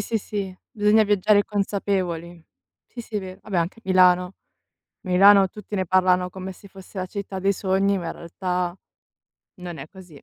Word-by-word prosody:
sì, 225 +3 -2
sì. 195 -3 -5
Bisogna 210 +1 +4
viaggiare 205 0 +3
consapevoli. 185 -5 -2 0.4
Sì, 240 - -9
sì, 225 -1 -6
è - - -1
vero. 185 0 -9
Vabbè, 195 -4 -2
anche 170 +7 -2
Milano. 180 -1 +4 0.7
Milano 195 +1 +6
tutti 210 +2 -10
ne 185 -2 -1
parlano 180 0 +2
come 190 +1 -7
se 200 +2 -16
fosse 190 +1 -12
la 185 - -2
città 195 -1 -6
dei 195 +1 +2
sogni, 195 +1 +1
ma 175 - -5
in 165 - -3
realtà 180 +1 -3 0.8
non 175 -3 -7
è 135 - -7
così. 175 -7 -15
190 Hz, 170 wpm, -23 LUFS, 180-200 Hz, 0.8 s, Milano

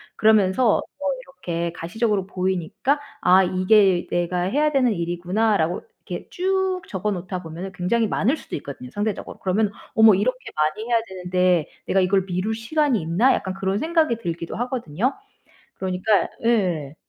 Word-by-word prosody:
그러면서 215 +1 +4 0.2
뭐 285 - -2 0.2
이렇게 170 -11 -4
가시적으로 200 +3 -1
보이니까 190 - -1 0.2
'아 185 +1 +6
이게 185 0 +3
내가 175 +1 0
해야 295 +11 +1
되는 255 -5 +3
일이구나.'라고 175 +1 0 0.3
이렇게 - - -6
쭉 375 0 0
적어 195 +2 -2
놓다 185 -1 -4
보면은 170 +4 -7
굉장히 220 +6 +1
많을 260 +9 +1
수도 - - -7
있거든요 135 -3 -9
상대적으로. 205 +3 -3
그러면 200 +2 +1 0.2
'어머 220 -1 +7
이렇게 255 +7 0 0.2
많이 155 +9 0
해야 235 -1 +3
되는데 180 -2 +1 0.2
내가 195 - +2
이걸 190 +1 +2
미룰 185 +4 -1
시간이 250 - +1
있나?' 175 +11 +3
약간 190 - -2
그런 195 +1 -1
생각이 320 -5 +1
들기도 170 -5 -5
하거든요. 245 - -1 0.6
그러니까 190 +2 +1 0.2
예. 175 -11 +1
195 Hz, 365 characters per minute, -23 LUFS, 180-230 Hz, 0.6 s, 어머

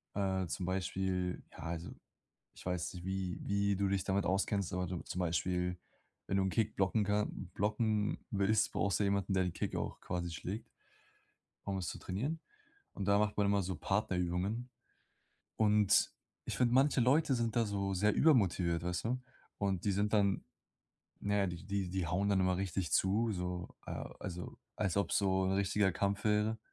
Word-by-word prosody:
Äh, 95 -2 0
zum 90 - -3
Beispiel, 95 -1 -1
ja, - - -14
also 85 +1 -4 0.7
ich - - -13
weiß 90 -1 -2
nicht, 90 -1 -8
wie 95 -2 -2
wie 100 0 +1
du 100 +1 +1
dich 95 -1 0
damit 95 +1 0
auskennst, 95 0 +1
aber 90 0 0
du 90 0 -3
zum 90 - -5
Beispiel, 90 +1 0 0.5
wenn 95 - +1
du 95 - +3
'n 95 - +1
Kick 110 0 0
blocken 100 +3 +2
kan 105 -2 -1
blocken 105 0 +1
willst, 105 +2 +2
brauchst 100 -3 +1
du - - +2
jemanden, 100 -1 +1
der 95 -1 +3
den 90 -2 -2
Kick - - -3
auch - - -3
quasi 90 -1 -3
schlägt 95 +7 -5 1.0
um 100 -1 -1
es 90 -2 -3
zu - - -4
trainieren. 135 - -2 0.5
Und 100 - -4
da 100 0 +5
macht 105 0 +1
man 105 - +3
immer 100 0 +3
so 95 +1 -3
Partnerübungen. 95 +4 -1 0.9
Und 105 -2 +4 0.3
ich - - -3
finde, 120 -1 +3
manche 135 +2 +4
Leute 135 +3 +4
sind 115 -2 -1
da 115 -1 +3
so 100 -2 -1
sehr 105 +3 +3
übermotiviert, 90 - +3
weißt 90 +2 -2
du? 125 +2 -1 0.4
Und 95 -3 -1
die 100 - +3
sind 100 +2 0
dann 100 -2 +3 0.8
ja, 100 -1 +1
die 85 -2 -5
die 100 -1 -1
die 95 -2 -1
hauen 95 +5 +1
dann 100 -2 +3
immer 95 -1 +2
richtig 95 -4 -2
zu, 110 +4 +3
so, 90 -1 -3 0.2
äh, - - -6 0.3
also, 90 -1 -6 0.2
als 100 -4 0
ob's 100 - +1
so 95 -1 +2
'n 95 - +1
richtiger 100 0 +2
Kampf 100 +2 -1
wäre. 105 +1 +2
95 Hz, 180 wpm, -34 LUFS, 90-105 Hz, 1.0 s, da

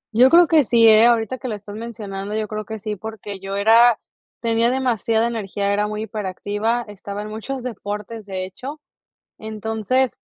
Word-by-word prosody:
Yo 250 +3 +7
creo 345 +3 +7
que 315 -2 +5
sí, 230 -2 +5
eh, 220 +1 +8
ahorita 235 +1 +1
que 260 - -5
lo 220 - -2
estás 205 0 -10
mencionando, 210 -3 -6
yo 215 -1 -1
creo 215 0 -5
que 220 +2 -6
sí, 210 +1 -4
porque 210 -1 -7
yo 195 +1 -5
era 225 +3 +5 0.4
tenía 230 0 +2
demasiada 235 -3 +1
energía, 200 -3 -2
era 210 +1 +1
muy 215 0 -4
hiperactiva, 215 +3 -2
estaba 205 0 -7
en 210 - -7
muchos 240 +5 -5
deportes, 210 -1 -6
de 185 -1 -3
hecho. 260 +11 -8 0.6
Entonces, 220 +4 -1
220 Hz, 175 wpm, -21 LUFS, 205-235 Hz, 0.6 s, eh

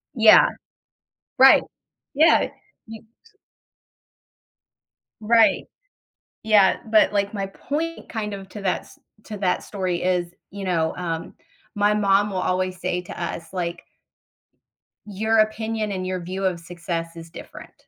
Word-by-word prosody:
Yeah. 225 - +7 0.9
Right, 265 +1 +7 0.5
Yeah, 315 +4 +4 0.4
y 225 0 -9
s 410 - -27 1.9
Right. 220 -2 +3 0.8
Yeah, 210 -3 +4
but 215 - +5
like 200 0 0
my 195 -2 -3
point 315 +11 -5
kind 210 -2 -4
of 195 -1 -8
to 210 - -9
that, 190 -2 -1
s - - -19 0.3
to 210 -2 -7
that 185 -2 0
story 185 -4 -3
is, 180 -1 -1 0.2
you 200 0 -7
know, 165 -3 0
um, 165 -2 -5 0.4
my 205 0 +2
mom 205 0 +2
will 190 - -3
always 185 0 -1
say 180 0 -2
to 175 - -9
us, 170 -1 -5
like 175 -2 -4 1.2
Your 220 +2 0
opinion 215 0 0
and 185 -1 -4
your 185 -1 -3
view 190 +2 -4
of 180 -2 -1
success 170 -1 -5
is 165 0 -10
different. - - -12
195 Hz, 135 wpm, -23 LUFS, 180-215 Hz, 1.9 s, Yeah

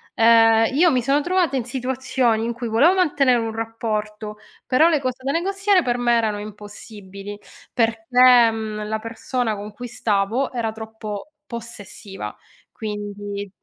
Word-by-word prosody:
Ehm, 225 0 +6
io 335 +2 +5
mi 250 -2 +2
sono 275 +4 +2
trovata 350 -4 +1
in 250 - 0
situazioni 255 -2 0
in 235 - -2
cui 240 0 -5
volevo 275 +12 +4
mantenere 280 -8 +3
un 225 -1 -3
rapporto, 215 -2 -4 0.3
però 310 +6 +4
le 310 - +2
cose 255 -1 -4
da 270 - 0
negoziare 390 +3 +2
per 245 0 0
me 240 -1 +2
erano 215 -2 0
impossibili. 205 -1 -9 0.3
Perché, 235 +1 +5
mhmm, 215 -1 -5
la 220 0 -2
persona 225 +1 -3
con 205 +1 -7
cui 245 +4 -8
stavo 225 +3 0
era 230 -3 -2
troppo 220 +3 -7 0.2
possessiva, 205 - -6 0.4
quindi 205 -1 -6
230 Hz, 145 wpm, -22 LUFS, 215-255 Hz, 0.4 s, Ehm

